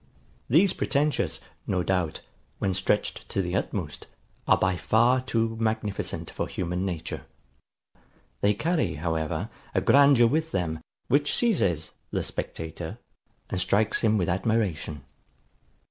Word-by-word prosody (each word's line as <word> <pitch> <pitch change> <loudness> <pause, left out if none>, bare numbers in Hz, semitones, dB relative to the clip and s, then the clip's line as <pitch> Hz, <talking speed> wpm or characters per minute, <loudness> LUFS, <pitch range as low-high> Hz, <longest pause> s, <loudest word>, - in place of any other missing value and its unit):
These 170 +8 +5
pretentious, 145 +2 0 0.3
no 90 -2 +1
doubt, 90 -5 -1 0.4
when 95 - 0
stretched - - -1
to - - -2
the 90 -1 -1
utmost, 85 -7 -3 0.4
are - - +6
by 95 0 +1
far 120 +7 +3
too 115 -3 0
magnificent 110 -2 -2
for - - -3
human 90 +1 -2
nature. 85 -4 -5 1.1
They 105 0 +3
carry, 150 - 0
however, 80 +5 -2 0.2
a - - +3
grandeur 140 -4 +6
with 160 +6 0
them, 80 -3 -1 0.3
which 145 +1 +2
seizes 100 - +2 0.2
the - - -1
spectator, 80 -1 -5 0.5
and 90 - 0
strikes 105 +4 +3
him 110 -1 +4
with 90 -4 0
admiration. 95 - -1
100 Hz, 125 wpm, -27 LUFS, 85-120 Hz, 1.1 s, are